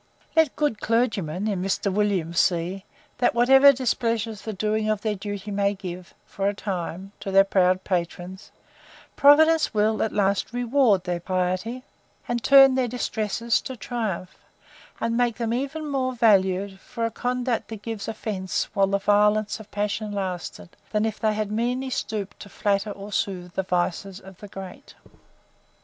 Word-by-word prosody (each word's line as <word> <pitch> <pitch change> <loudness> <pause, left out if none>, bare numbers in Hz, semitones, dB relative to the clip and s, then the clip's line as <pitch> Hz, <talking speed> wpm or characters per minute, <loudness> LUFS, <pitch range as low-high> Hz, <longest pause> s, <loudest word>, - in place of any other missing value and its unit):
Let 320 -4 +3
good 290 -8 -1
CLERGYMEN, 210 -6 0
in 195 -4 -1
Mr. 195 +1 -1
WILLIAMS, 190 -5 0
see, 180 +2 0 0.3
that 245 - +2
whatever 265 +4 +7
displeasure 230 -4 -1
the 215 +1 -7
doing 215 +1 -1
of 215 -1 0
their 215 -2 -1
duty 205 +1 -6
may 200 0 +1
give, 180 -2 -8
for 195 0 -3
a 205 - -4
time, 190 -1 -5
to - - -6
their 195 0 +6
proud 185 -1 +2
patrons, 180 +1 -4 0.6
Providence 315 0 +5
will, 215 +1 +2
at 220 - 0
last, 200 +2 0
reward 245 -5 +2
their 175 -1 -2
piety, 185 +7 -2 0.4
and 240 -1 -2
turn 270 -1 +7
their 255 -1 +1
distresses 230 -1 -1
to 260 - -7
triumph; 215 -7 -4 0.6
and 230 0 -1
make 240 -1 +1
them 230 -1 -2
even 280 +5 -3
more 260 -2 -1
valued 195 -4 +2
for 230 +3 -4
a 230 - -2
conduct 245 +1 -2
that 220 -2 -9
gave 225 -3 -5
offence 210 -4 -3
while 195 -2 +3
the 200 +1 +1
violence 210 +2 +2
of 215 -1 -12
passion 210 +1 -2
lasted, 180 - -5 0.2
than 210 0 0
if 220 -1 -3
they 215 -1 +1
had 215 -1 -2
meanly 250 +4 -1
stooped 210 -5 -4
to 200 - -10
flatter 200 +1 0
or 200 0 -8
soothe 180 -3 -3
the - - 0
vices 185 +1 -2
of 190 -2 -14
the 205 - -9
great. 195 -2 -10
210 Hz, 165 wpm, -24 LUFS, 190-235 Hz, 0.6 s, whatever